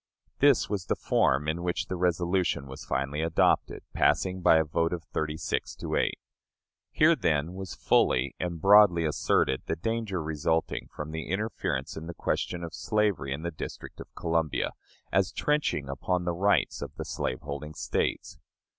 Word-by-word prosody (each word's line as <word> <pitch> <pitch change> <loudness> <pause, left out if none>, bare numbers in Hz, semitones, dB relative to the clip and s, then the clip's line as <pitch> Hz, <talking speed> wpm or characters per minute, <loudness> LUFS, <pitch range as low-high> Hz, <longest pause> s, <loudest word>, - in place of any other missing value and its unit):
This 140 -3 +5
was 100 -4 -3
the - - +1
form 70 +3 +1
in 80 +2 -1
which 90 0 -1
the 95 - -4
resolution 90 -3 0
was 65 0 -9
finally 70 +3 -1
adopted, 80 0 +1
passing 95 -1 +2
by 80 - +6
a 80 - +4
vote 80 +2 0
of 85 -2 -4
thirty 75 +2 -3
six - - -2
to - - -4
eight. - - +1 0.7
Here, - - +5
then, 75 +3 0
was 95 -1 -6
fully 65 +1 +2
and 85 -2 -3
broadly 95 -2 +6
asserted 65 -3 +1
the - - 0
danger 110 0 -2
resulting 80 +1 -1
from 75 +1 -6
the 80 0 -5
interference 95 -8 -2
in 80 +1 -7
the 85 - -7
question 90 -1 -2
of 85 - -6
slavery 105 -10 0
in 70 +4 -3
the 85 - -2
District 80 - -8
of - - -8
Columbia, 80 -2 0 0.4
as - - +2
trenching 150 - 0
upon 90 +7 -1
the 85 - 0
rights 100 +4 +1
of - - -7
the - - -5
slaveholding 70 +3 -4
States. - - -2
85 Hz, 165 wpm, -28 LUFS, 75-90 Hz, 0.7 s, by